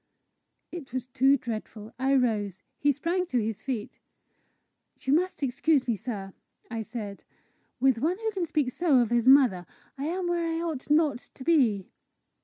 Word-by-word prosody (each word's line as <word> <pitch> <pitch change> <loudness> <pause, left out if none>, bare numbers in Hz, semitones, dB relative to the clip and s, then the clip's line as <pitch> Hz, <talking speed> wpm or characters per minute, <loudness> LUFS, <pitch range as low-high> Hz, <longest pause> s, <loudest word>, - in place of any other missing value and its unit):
It 310 -8 -8
was 255 -2 -2
too 265 +2 +3
dreadful! 220 -2 -6
I 270 +1 +2
rose. 210 -7 0 0.2
He 290 - +4
sprang 340 +6 -1
to 250 - +1
his 220 -2 -3
feet. 245 -6 -5 1.0
"You 265 - 0
must 360 -1 0
excuse 275 +2 +2
me, 235 - +1
sir!" 200 -3 -6 0.4
I 225 -1 -2
said. 215 -2 -7 0.6
"With 260 -2 +3
one 330 +8 0
who 445 0 -2
can 375 -4 -2
speak 295 -5 0
so 315 -1 +3
of 240 -2 +2
his 240 0 +2
mother, 255 -10 +5 0.3
I 280 - -2
am 355 +3 -2
where 345 -1 0
I - - -1
ought 320 -6 -4
not 300 -4 +2
to 260 - -9
be." 245 - +2
260 Hz, 170 wpm, -27 LUFS, 225-315 Hz, 1.0 s, mother